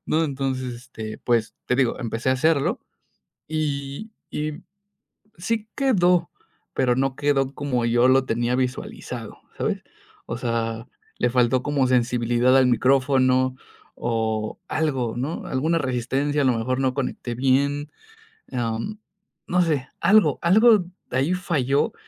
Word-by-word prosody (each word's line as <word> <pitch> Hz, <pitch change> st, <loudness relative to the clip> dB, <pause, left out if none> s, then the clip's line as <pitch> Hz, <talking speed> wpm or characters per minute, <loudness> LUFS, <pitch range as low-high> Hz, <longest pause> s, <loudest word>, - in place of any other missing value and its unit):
¿no? 160 Hz, +1 st, +2 dB
Entonces, 130 Hz, -3 st, -2 dB
este, 115 Hz, -3 st, -8 dB
pues, 115 Hz, -2 st, +1 dB
te 125 Hz, -, +1 dB
digo, 130 Hz, -3 st, +1 dB
empecé 115 Hz, +1 st, -2 dB
a -, -, +4 dB
hacerlo, 150 Hz, +1 st, +2 dB, 0.7 s
y 150 Hz, +5 st, -3 dB, 0.2 s
y 150 Hz, 0 st, -3 dB, 0.8 s
sí 215 Hz, +4 st, -2 dB
quedó, 180 Hz, -10 st, +2 dB, 0.4 s
pero 125 Hz, -2 st, +2 dB
no 135 Hz, 0 st, 0 dB
quedó 140 Hz, -2 st, +1 dB
como 130 Hz, -5 st, -1 dB
yo 120 Hz, +2 st, +4 dB
lo 130 Hz, 0 st, +4 dB
tenía 120 Hz, +1 st, 0 dB
visualizado, 130 Hz, 0 st, -4 dB, 0.2 s
¿sabes?, -, -, -2 dB, 0.4 s
o 115 Hz, -, -4 dB
sea, 115 Hz, -1 st, -2 dB, 0.3 s
le -, -, +2 dB
faltó 125 Hz, +1 st, +2 dB
como 145 Hz, -3 st, +1 dB
sensibilidad 120 Hz, +1 st, +3 dB
al 130 Hz, -, +5 dB
micrófono 130 Hz, 0 st, +3 dB, 0.4 s
o 110 Hz, -2 st, -2 dB
algo, 130 Hz, -8 st, -1 dB
¿no?, 140 Hz, +7 st, -3 dB
alguna 160 Hz, +6 st, 0 dB
resistencia, 135 Hz, +2 st, 0 dB
a -, -, +2 dB
lo 125 Hz, -3 st, +3 dB
mejor, 130 Hz, +3 st, -1 dB
no 130 Hz, -1 st, 0 dB
conecté 125 Hz, -3 st, -3 dB
bien, 140 Hz, +3 st, +1 dB, 0.6 s
am, 120 Hz, -, -2 dB, 0.5 s
no 180 Hz, 0 st, +2 dB
sé, 145 Hz, -6 st, 0 dB
algo, 215 Hz, 0 st, +4 dB
algo 210 Hz, +2 st, +5 dB, 0.3 s
ahí 135 Hz, +7 st, +1 dB
falló 150 Hz, -, 0 dB
130 Hz, 130 wpm, -23 LUFS, 120-150 Hz, 0.8 s, al